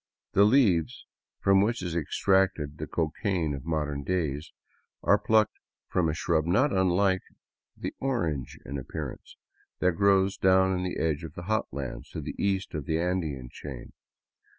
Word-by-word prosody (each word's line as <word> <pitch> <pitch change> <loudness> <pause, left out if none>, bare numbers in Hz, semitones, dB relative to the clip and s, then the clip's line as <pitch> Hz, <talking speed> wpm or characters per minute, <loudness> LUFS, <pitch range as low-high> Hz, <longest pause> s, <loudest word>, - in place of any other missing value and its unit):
The 100 - +5
leaves 100 - +3 0.2
— - - -65
from 95 0 +5
which 115 0 0
is 85 -2 -3
extracted 85 -2 +1
the - - -4
cocaine 85 0 -1
of 70 0 -6
modern 75 -3 -1
days 80 -3 -2 0.3
— - - -45
are - - +4
plucked 110 -1 +2 0.3
from 85 -3 +1
a 75 - -1
shrub 80 -1 +1
not 130 +11 +3
unlike 95 0 +3 0.6
the - - -4
orange 85 - -2
in 70 +2 -4
appearance, 65 - -7 0.4
that 90 - +3
grows 95 +1 +3
down 95 0 +4
in 90 - -2
the 90 - -3
edge 80 0 0
of 80 - -8
the 85 - -7
hot 110 +4 0
lands 70 -1 -6
to - - -6
the - - -5
east 95 -1 0
of 75 -4 -4
the 80 0 +1
Andean 80 -8 -2
chain. 65 -5 -9
90 Hz, 170 wpm, -28 LUFS, 75-95 Hz, 0.6 s, The